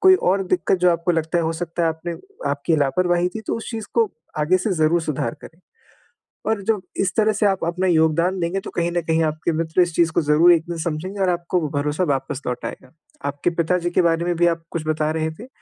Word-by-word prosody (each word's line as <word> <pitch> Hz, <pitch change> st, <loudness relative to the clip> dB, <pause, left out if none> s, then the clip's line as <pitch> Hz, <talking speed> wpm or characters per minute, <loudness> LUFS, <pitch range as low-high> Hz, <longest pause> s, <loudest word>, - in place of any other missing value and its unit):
कोई 375 Hz, 0 st, +7 dB, 0.2 s
और 195 Hz, +1 st, +2 dB
दिक्कत 185 Hz, +1 st, +1 dB
जो 180 Hz, 0 st, +4 dB
आपको 170 Hz, +1 st, +1 dB
लगता 165 Hz, +1 st, 0 dB
है 170 Hz, -, +1 dB
हो 160 Hz, -, 0 dB
सकता 170 Hz, 0 st, -3 dB
है 165 Hz, -, +3 dB
आपने 160 Hz, +2 st, -4 dB, 0.4 s
आपकी 145 Hz, +3 st, 0 dB
लापरवाही 175 Hz, +5 st, +2 dB
थी 220 Hz, -, -4 dB
तो -, -, -1 dB
उस 225 Hz, -, -6 dB
चीज़ 225 Hz, -3 st, -5 dB
को 225 Hz, -5 st, +3 dB, 0.3 s
आगे 160 Hz, +5 st, +3 dB
से 190 Hz, +2 st, -1 dB
ज़रूर 165 Hz, 0 st, +2 dB
सुधार 135 Hz, -7 st, -2 dB
करें। 165 Hz, -, -13 dB, 0.9 s
और 220 Hz, -2 st, +1 dB
जब 220 Hz, -3 st, +2 dB, 0.2 s
इस 190 Hz, -1 st, +2 dB
तरह 215 Hz, 0 st, +3 dB
से 215 Hz, +1 st, 0 dB
आप 195 Hz, -2 st, +1 dB
अपना 180 Hz, +2 st, 0 dB
योगदान 170 Hz, +2 st, +2 dB
देंगे 175 Hz, +3 st, -1 dB
तो -, -, -6 dB
कहीं 170 Hz, 0 st, 0 dB
न 175 Hz, 0 st, 0 dB
कहीं 160 Hz, 0 st, +2 dB
आपके 155 Hz, +1 st, -1 dB
मित्र 160 Hz, +2 st, +1 dB
इस 175 Hz, -1 st, +1 dB
चीज़ 165 Hz, -2 st, +3 dB
को -, -, +1 dB
ज़रूर 155 Hz, +3 st, +5 dB
एक 165 Hz, -, +2 dB
दिन 170 Hz, -, -3 dB
समझेंगे 170 Hz, +4 st, -4 dB
और 190 Hz, -, +3 dB
आपको 175 Hz, +1 st, 0 dB
भरोसा 150 Hz, +4 st, -1 dB
वापस 135 Hz, 0 st, -2 dB
लौट 125 Hz, 0 st, -3 dB
आएगा। 130 Hz, -, -8 dB, 0.4 s
आपके 145 Hz, +4 st, -1 dB
पिताजी 175 Hz, +1 st, +1 dB
के 180 Hz, -, +3 dB
बारे 170 Hz, 0 st, +2 dB
में 175 Hz, -1 st, 0 dB
भी 175 Hz, 0 st, +4 dB
आप 165 Hz, -1 st, 0 dB
कुछ 160 Hz, -2 st, -3 dB
बता 155 Hz, 0 st, 0 dB
रहे 160 Hz, 0 st, -1 dB
थे, 215 Hz, +11 st, -11 dB
170 Hz, 240 wpm, -22 LUFS, 160-180 Hz, 0.9 s, कोई